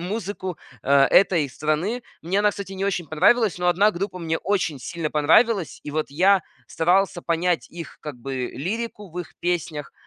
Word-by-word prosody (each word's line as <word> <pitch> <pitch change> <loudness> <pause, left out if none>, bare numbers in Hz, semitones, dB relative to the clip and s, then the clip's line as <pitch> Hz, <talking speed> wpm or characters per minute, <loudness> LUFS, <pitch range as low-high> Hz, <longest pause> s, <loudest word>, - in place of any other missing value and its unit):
музыку, 190 -1 -4 0.2
а, 140 0 +5
этой 170 -5 +4
страны. 155 - -1 0.2
Мне 180 +4 0
она, 210 0 +4
кстати, 200 -1 -7
не 195 0 -3
очень 195 -4 -1
понравилась, 200 - +3
но 180 0 +1
одна 195 +4 +4
группа 190 0 -4
мне 160 -2 -1
очень 185 -8 -1
сильно 165 +2 -4
понравилась. 170 +6 +3
И - - -6
вот 155 +1 -1
я 185 +5 +4 0.2
старался 180 +2 +1
понять 170 +1 0
их, 170 -1 -9
как 150 -4 -7
бы, 130 0 -4
лирику 205 - -4
в 175 - -7
их 170 -2 -7
песнях, 165 -4 -2
175 Hz, 175 wpm, -23 LUFS, 155-195 Hz, 0.2 s, а